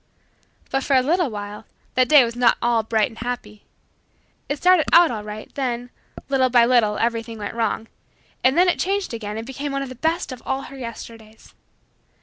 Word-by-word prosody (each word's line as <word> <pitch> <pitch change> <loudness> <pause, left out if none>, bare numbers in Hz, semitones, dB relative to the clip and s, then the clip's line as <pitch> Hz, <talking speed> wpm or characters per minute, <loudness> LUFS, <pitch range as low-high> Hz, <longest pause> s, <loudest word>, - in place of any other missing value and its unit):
But, 270 0 0
for 275 - +1
a 255 - +4
little 335 +2 +1
while, 205 -1 -7 0.3
that 255 0 +2
day 295 -4 +8
was 235 0 -5
not 245 -1 +4
at - - -3
all 235 -1 +3
bright 220 +1 0
and 225 - -13
happy. 230 -4 -6 0.8
It 285 - -1
started 360 0 +4
out 340 0 +6
all 215 -3 -4
right 210 +1 -9
then, 245 -2 -3 0.4
little 265 -2 +2
by 240 -1 +5
little, 235 -4 +3
everything 230 0 -2
went 205 -1 -5
wrong; 225 -1 -2 0.6
and 260 +4 +3
then 360 +1 +5
it 355 - +1
changed 390 -5 -1
again 210 -2 -5
and 225 - -5
became 275 +3 -5
one 275 0 -2
of 270 - -7
the - - -7
best 320 +5 -1
of 250 -2 -8
all 270 +1 -2
her 275 - -10
Yesterdays. 230 -3 -10
245 Hz, 200 wpm, -22 LUFS, 225-275 Hz, 0.8 s, day